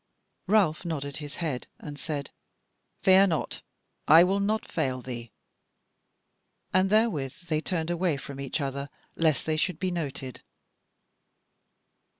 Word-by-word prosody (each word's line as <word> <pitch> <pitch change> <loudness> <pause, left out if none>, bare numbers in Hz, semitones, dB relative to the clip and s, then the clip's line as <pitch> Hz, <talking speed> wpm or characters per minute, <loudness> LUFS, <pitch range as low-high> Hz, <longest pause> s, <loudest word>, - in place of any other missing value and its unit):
Ralph 190 -7 +3
nodded 140 -5 -4
his 145 -1 -7
head, 150 -7 -3
and 145 -1 -8
said: 145 -3 -4 0.7
"Fear 190 +1 +7
not, 160 -4 -2 0.5
I 160 +3 +9
will 195 +2 +2
not 215 +2 0
fail 135 -7 -1
thee." 120 -3 -7 1.4
And 185 +1 +4
therewith 205 - +2 0.2
they 155 -1 +1
turned 165 -1 -2
away 175 -3 +1
from 140 0 -8
each 140 +3 -2
other 140 0 -3 0.3
lest 160 -3 +2
they 155 -1 0
should 165 +1 0
be 185 +1 -1
noted. 140 -6 -4
155 Hz, 130 wpm, -28 LUFS, 140-180 Hz, 1.4 s, I